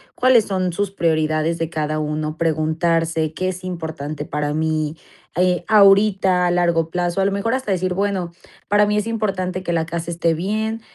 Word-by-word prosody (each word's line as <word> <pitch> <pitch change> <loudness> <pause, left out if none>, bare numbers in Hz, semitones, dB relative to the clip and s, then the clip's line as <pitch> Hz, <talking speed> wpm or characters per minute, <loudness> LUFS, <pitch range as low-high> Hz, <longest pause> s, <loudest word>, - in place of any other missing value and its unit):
cuáles 250 -4 +4
son 185 -3 -1
sus 200 +1 -2
prioridades 155 -2 0
de 165 -1 -2
cada 155 -2 -2
uno, 155 +1 -3
preguntarse: 160 0 0
"¿Qué 185 +3 -2
es 185 0 -6
importante 160 -4 -5
para 150 0 -2
mí?", 155 0 -1 0.4
eh 180 -1 +1
ahorita 195 -3 +4
a - - +1
largo 170 -2 +1
plazo. 175 +2 -1
A - - +2
lo 200 - +1
mejor, 200 +4 -1
hasta 260 -6 -3
decir: 185 -1 0
"Bueno, 190 -3 -1 0.4
para 205 +1 +4
mí 210 - +1
es 210 - 0
importante 190 -5 -2
que 175 - -2
la 160 -1 0
casa 170 0 -4
esté 165 0 +1
bien, 215 +6 -2
175 Hz, 180 wpm, -20 LUFS, 160-195 Hz, 0.4 s, cuáles